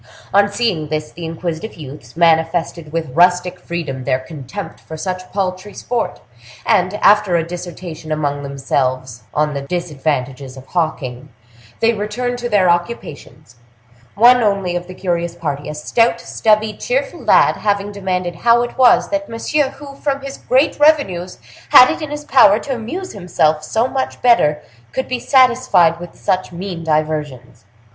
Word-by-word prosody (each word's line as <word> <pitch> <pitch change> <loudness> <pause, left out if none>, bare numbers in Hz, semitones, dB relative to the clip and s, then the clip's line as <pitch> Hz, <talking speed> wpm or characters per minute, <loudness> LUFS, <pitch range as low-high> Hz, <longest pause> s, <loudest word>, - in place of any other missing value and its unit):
On 205 +1 +4
seeing 195 -9 -1
this, 155 0 -3
the 170 0 -8
inquisitive 165 +4 -5
youths 140 -2 -11
manifested 165 -1 +1
with 160 -5 -3
rustic 180 +1 +3
freedom 160 -7 -5
their 130 - +1
contempt 145 +7 -8
for 160 - -9
such 185 +2 -5
paltry 190 +1 -3
sport, 240 -1 -3 0.5
and, 185 +2 +2
after 205 -3 +5
a 165 - +2
dissertation 175 -2 -8
among 145 -2 -1
themselves 130 -3 -2
upon 150 0 0
the 140 - -3
disadvantages 140 -5 -3
of 130 - -11
hawking, 145 -6 -3 0.5
they 230 0 +4
returned 245 +4 -3
to 240 0 -3
their 200 -4 +3
occupations; 155 - -3 0.6
one 245 +3 +6
only 200 -5 0
of 175 0 -4
the 185 - -9
curious 170 -2 -2
party, 145 -4 -4
a 150 - -5
stout, 230 +9 +1
stubby, 215 0 +1
cheerful - - -2
lad, - - +4
having 205 -1 -1
demanded 185 -3 -3
how 235 +4 +4
it 240 - -7
was 250 -2 +5
that 300 0 -2
Monsieur, 265 +5 0
who, 280 0 -11
from 275 0 -2
his 275 0 -8
great 265 +4 +1
revenues, 195 - +2 0.3
had 255 - +8
it - - -5
in 305 - -4
his 295 0 -6
power 210 -8 +6
to 270 +4 -4
amuse 320 +11 -5
himself 160 -5 0
so 225 +9 0
much 265 0 -3
better, 150 -12 +3 0.3
could 260 - -2
be 250 -1 -2
satisfied 240 - +3
with 175 -1 -10
such 185 0 -1
mean 175 -1 -6
diversions. 150 -7 -2
180 Hz, 155 wpm, -18 LUFS, 155-225 Hz, 0.6 s, had